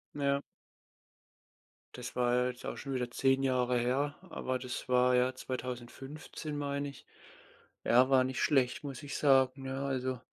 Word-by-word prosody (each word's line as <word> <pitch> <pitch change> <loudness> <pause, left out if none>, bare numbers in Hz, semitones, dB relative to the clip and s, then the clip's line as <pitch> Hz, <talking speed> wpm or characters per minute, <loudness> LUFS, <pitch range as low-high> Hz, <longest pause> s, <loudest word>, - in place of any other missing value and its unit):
Ja. 140 -1 +1 1.5
Das - - -6
war 125 0 +3
jetzt 125 0 -8
auch - - -3
schon 135 -1 -5
wieder 125 -1 -1
10 135 +2 +2
Jahre 125 -2 +2
her, 135 +4 0
aber 130 0 -2
das 125 0 -5
war, 125 0 +4
ja, 125 +1 +3
2015, 130 +4 -6
meine 140 0 -2
ich. 140 - -13 0.8
Ja, 125 +3 +5
war 130 -1 +5
nicht 130 0 -2
schlecht, 135 0 +2
muss 135 -3 -6
ich 140 - -5
sagen, 135 -1 +4
ja, 135 +1 -3
also, 130 -2 -1
130 Hz, 150 wpm, -32 LUFS, 125-140 Hz, 1.5 s, Ja